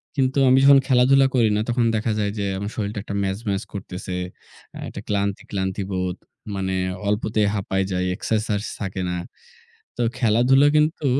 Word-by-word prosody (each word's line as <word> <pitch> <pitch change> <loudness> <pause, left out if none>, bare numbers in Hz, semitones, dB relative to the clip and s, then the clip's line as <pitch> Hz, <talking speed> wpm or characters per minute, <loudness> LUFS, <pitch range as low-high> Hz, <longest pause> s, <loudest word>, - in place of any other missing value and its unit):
কিন্তু 135 -1 +1
আমি 130 - +5
যখন 140 0 +8
খেলাধুলা 135 +1 +5
করি 115 -3 +4
না, 105 - +1
তখন 120 0 +1
দেখা 110 +1 0
যায় 100 -1 0
যে 100 - -1
আমার 100 +2 -4
শরীরটা 105 -1 -3
একটা 100 - -5
ম্যাজম্যাজ 100 +1 -2
করতেছে। 90 -1 -6 0.6
অ্যা - - -9
একটা - - -8
ক্লান্তি, 100 -1 -1
ক্লান্তি, 95 0 -2
বোধ। 90 -1 -2 0.4
মানে, 95 -1 -2 0.3
অল্পতেই 105 0 +1
হাঁপায় 95 -1 -1
যাই, 90 0 0
এক্সারসাইজ 105 0 -1 0.2
থাকে 95 -2 -4
না। 90 - -2 0.8
তো - - +1 0.2
খেলাধুলা 125 +4 +4
কিন্তু 150 0 +1
105 Hz, 160 wpm, -22 LUFS, 95-125 Hz, 0.8 s, যখন